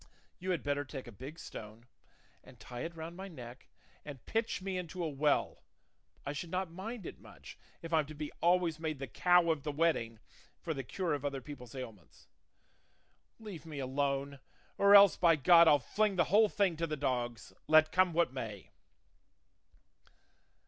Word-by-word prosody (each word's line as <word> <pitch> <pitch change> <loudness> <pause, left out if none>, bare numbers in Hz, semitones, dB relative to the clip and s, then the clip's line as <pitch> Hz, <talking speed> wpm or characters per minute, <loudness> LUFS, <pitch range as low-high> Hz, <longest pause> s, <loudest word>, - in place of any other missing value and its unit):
You 185 +1 -5
had 175 -6 -1
better 145 0 -1
take 135 -2 -8
a 120 - -10
big 130 +9 -10
stone 110 -6 -10 0.6
and - - -17
tie 120 - -9
it 165 +3 -5
round 165 +1 -7
my 190 +2 -7
neck, 125 -7 -11 0.4
and 140 -5 -10
pitch 225 +1 -1
me 190 0 -4
into 180 0 -4
a - - 0
well; 145 0 0 0.6
I 140 - -3
should 155 +4 -6
not 185 0 -2
mind 200 +4 -7
it - - -8
much, - - -13 0.3
if 165 0 -6
I'm 155 -3 +2
to 155 - -9
be 150 0 -5
always 175 -2 +2
made 160 -2 -3
the 135 - -5
cow 175 +4 +3
of 160 -3 -2
the 150 - -3
wedding 145 -7 0 0.4
for 165 - -3
the 135 - -4
cure 170 +5 -2
of 145 -2 -3
other 140 -1 -2
people's 130 -3 -10
ailments. 110 -9 -10 1.1
Leave 200 -9 -9
me 155 -3 -9
alone; 140 +1 -2 0.4
or 200 0 +6
else 200 -2 +8
by 170 -2 +5
God 170 +3 +6
I'll 150 - +7
fling 205 - 0
the 175 - +4
whole 215 0 +6
thing 195 -5 +1
to 165 +1 -1
the 155 -1 -3
dogs, 120 -4 -3
let 155 0 +5
come 185 +1 +3
what 165 -5 +1
may." 110 -7 -7
155 Hz, 180 wpm, -33 LUFS, 135-175 Hz, 1.1 s, else